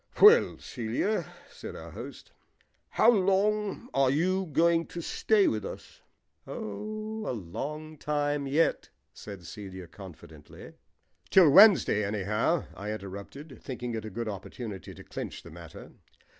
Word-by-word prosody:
"Well, 435 +3 +7
Celia," 125 - -2 0.2
said - - -9
our - - -9
host, - - -10 0.6
"how 235 - +5
long 210 +2 +1
are 135 -1 +3
you 185 +7 +1
going 165 +2 +2
to 175 - -7
stay 205 +4 +2
with 110 -2 -1
us?" - - -9 0.5
"Oh, 215 - -5
a - - -1
long 150 - -6
time 145 -1 -1
yet," 155 +5 +1 0.2
said 100 -4 -10
Celia 95 +2 -8
confidently. 80 -4 -13 0.6
"Till 180 -6 +7
Wednesday, 190 - +7
anyhow," 105 - 0
I 105 +2 -5
interrupted, 110 +8 -8
thinking 125 -2 -5
it 110 -1 -4
a 110 - -6
good 115 +3 -4
opportunity 100 +1 -7
to - - -12
clinch - - -7
the - - -12
matter. - - -11
135 Hz, 130 wpm, -29 LUFS, -, 0.6 s, Well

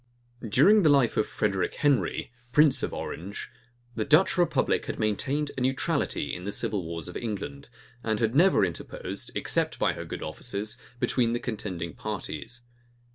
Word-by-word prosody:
During 195 - +6
the 160 - +5
life 135 -5 +4
of - - +2
Frederic 100 -3 -1
Henry, 135 - +1 0.2
prince 150 +1 +5
of - - -1
Orange, 95 +5 -6 0.4
the - - -1
Dutch 155 +6 +4
republic 175 -2 +2
had - - -3
maintained 140 +8 0
a 130 - -4
neutrality 130 - 0
in 90 - -5
the 100 - -3
civil 100 -2 -1
wars 85 0 -5
of 90 - -8
England, 120 +6 -5 0.3
and 110 -2 0
had 115 -1 +1
never 180 +7 +5
interposed, 85 - -5
except - - 0
by - - +2
her - - -6
good - - -6
offices, 105 +2 -3 0.2
between 120 -2 +2
the 120 - 0
contending 95 -8 -4
parties. 105 0 -5
115 Hz, 160 wpm, -27 LUFS, 100-140 Hz, 0.4 s, During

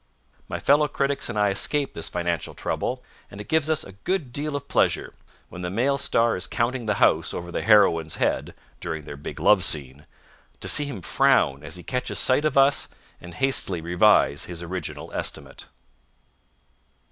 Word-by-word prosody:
My - - -3
fellow 150 +2 +3
critics 140 -1 -1
and 115 - -4
I 105 -1 +3
escape 140 +8 +2
this 80 - -4
financial 85 -2 -3
trouble, - - -3 0.3
and 100 - -11
it 105 - -8
gives 160 -1 +1
us 155 - +1
a - - -11
good 135 - -3
deal 145 +1 -3
of 140 - -5
pleasure, - - 0 0.4
when 90 - -9
the 90 - -3
male 130 +8 0
star 115 -1 +1
is 90 - -4
counting 120 0 -2
the 105 - +1
house - - +2
over 85 0 -6
the - - -3
heroine's 90 -7 +3
head - - -1 0.2
(during 80 -1 -5
their 75 0 -9
big 70 - -8
love - - +4
scene) 70 0 +2 0.5
to - - -4
see 145 - +5
him 115 -11 -7
frown 130 - +2
as 75 +2 -5
he 90 - -8
catches 125 0 -3
sight 135 +4 +3
of 150 -3 0
us 135 +1 +4 0.3
and 90 -1 -11
hastily 130 -9 +1
revise 85 -3 +2
his 85 -1 -7
original 90 +2 -6
estimate. - - -4
105 Hz, 180 wpm, -24 LUFS, 85-140 Hz, 0.5 s, see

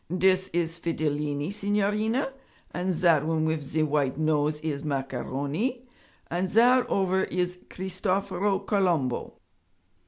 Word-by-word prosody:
'Dis 185 +1 +3
is 170 -1 -2
Fidilini, 150 0 -1
signorina, 210 +5 0 0.4
and 180 +1 -1
zat 165 -4 +3
one 160 0 0
wif 160 -1 0
ze 150 +3 -1
white 140 -3 0
nose 150 -1 +1
is 145 -3 -3
Macaroni, 145 - -2 0.4
and 180 +2 0
zat 245 +4 +5
ovver 190 -1 +1
is 180 0 -2
Cristoforo 190 +1 -1
Colombo.' 170 - 0
175 Hz, 115 wpm, -27 LUFS, 150-195 Hz, 0.4 s, zat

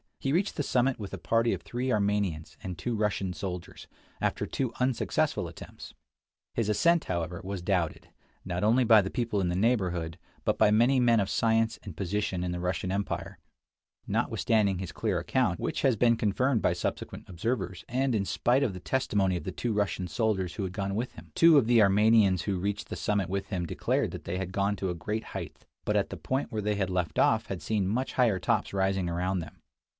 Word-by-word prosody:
He 135 - -1
reached 190 +5 +1
the 145 - -1
summit 130 -1 +1
with 100 -2 -5
a - - -10
party 115 +4 +2
of - - -4
three 125 +2 -3
Armenians 100 -7 0
and 90 -1 -4
two 115 +6 -2
Russian 100 -3 -1
soldiers, 90 +1 -6 0.3
after - - -1
two 130 -4 -2
unsuccessful 125 -1 0
attempts. - - -11 0.6
His 115 -2 -1
ascent, 170 +10 +3
however, 85 -1 -3
was 95 -1 -5
doubted, 90 -4 -1 0.4
not 90 0 -2
only 115 +4 +4
by 110 -2 +7
the 95 - -3
people 115 -4 -1
in 90 - 0
the 85 - -1
neighborhood, 90 -6 0 0.2
but - - 0
by - - +6
many 120 +5 +4
men 120 -2 +4
of 100 -1 0
science 115 0 +1
and 95 -6 -9
position 95 -1 -1
in 90 - -2
the 90 - -3
Russian 90 +1 -2
empire, 100 +1 -3 0.7
notwithstanding 105 -5 +1
his 90 -1 -5
clear 105 -6 -1
account, 95 0 0
which - - -2
has 135 -4 +3
been 115 +2 +4
confirmed 115 +4 +1
by - - +3
subsequent - - -4
observers, 95 0 -3
and 130 +1 +1
in 100 -3 +1
spite 125 +7 +2
of 115 -8 0
the 90 - -7
testimony 100 -5 0
of 85 - -6
the - - -4
two 120 -2 -2
Russian 100 -3 -1
soldiers 100 -5 -1
who 105 - -3
had 95 -1 -4
gone 100 0 -2
with 120 +4 -3
him. - - -12
l - - -24
Two 165 -2 +7
of 135 - +5
the 120 -2 +5
Armenians 100 -2 +4
who 95 -3 -1
reached 100 +2 -3
the - - -4
summit 100 -4 0
with 100 +1 -2
him 90 -4 -2
declared - - 0
that - - -8
they 90 - -3
had 95 -1 -4
gone 100 +2 0
to 95 - -2
a 90 - -2
great 105 +6 -3
height, - - -7 0.2
but - - +1
at - - 0
the - - -6
point 130 +1 -2
where 110 -2 -2
they 105 0 0
had 95 -2 -1
left 90 -3 -1
off - - +3
had - - -5
seen 105 -4 0
much 125 +7 -1
higher 115 -7 +3
tops - - 0
rising 95 -1 +1
around 90 +2 -1
them. 80 - -8
100 Hz, 215 wpm, -29 LUFS, 90-115 Hz, 0.7 s, by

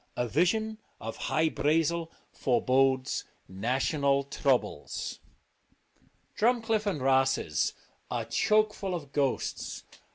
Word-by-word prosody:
A 120 - 0
vision 215 - +1 0.2
of 115 +1 -5
Hy 160 +1 +1
Brazel 165 +2 +1 0.2
forebodes 130 +1 +2 0.2
national 135 - +1
troubles. 135 -2 -1 1.2
Drumcliff 225 -2 +2
and 185 -7 0
Rosses 135 - +2 0.4
are - - -2
chokeful 210 -3 +1
of 145 -5 -7
ghosts. 140 -3 -1
145 Hz, 90 wpm, -29 LUFS, 130-190 Hz, 1.2 s, forebodes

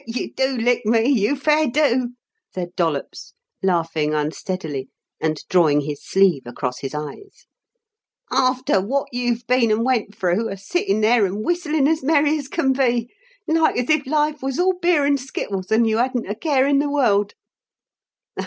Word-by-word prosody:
"Sir, - - -26
you - - -6
do 265 -1 0
lick 245 +1 +1
me, 225 +2 +2
you 245 0 +2
fair 300 +2 +2
do," 250 -2 +1 0.4
said 180 -1 -5
Dollops, 160 - -3 0.3
laughing 165 -4 0
unsteadily, 150 -2 -4 0.3
and 155 -1 -1
drawing 155 -5 +3
his 145 0 -6
sleeve 190 -7 +2
across 125 +1 -4
his 135 +2 -6
eyes. 150 - -8 0.9
"Arfter 255 -6 +1
wot 275 +7 -2
you've 245 -1 -2
been 250 -2 +2
and 215 +2 +1
went 230 -5 0
through, 190 +4 0
a 195 - -5
sittin' 205 - -1
there 225 +1 +4
and 205 +3 -5
whistlin' 315 -5 +1
as 320 +1 +1
merry 300 +1 +2
as 280 - -7
can 270 -3 0
be 245 -3 0 0.4
like 320 0 +2
as 250 +4 0
if 300 -3 +1
life 300 +1 0
was 270 0 -3
all 370 +1 +3
beer 345 -5 +2
and 280 -1 +2
skittles, 200 -7 -5
and 225 +1 +4
you 220 0 +1
hadn't 250 0 0
a 205 - -2
care 270 +3 +1
in 280 0 +3
the 290 0 0
world." 210 -8 +1
240 Hz, 170 wpm, -21 LUFS, 190-280 Hz, 0.9 s, there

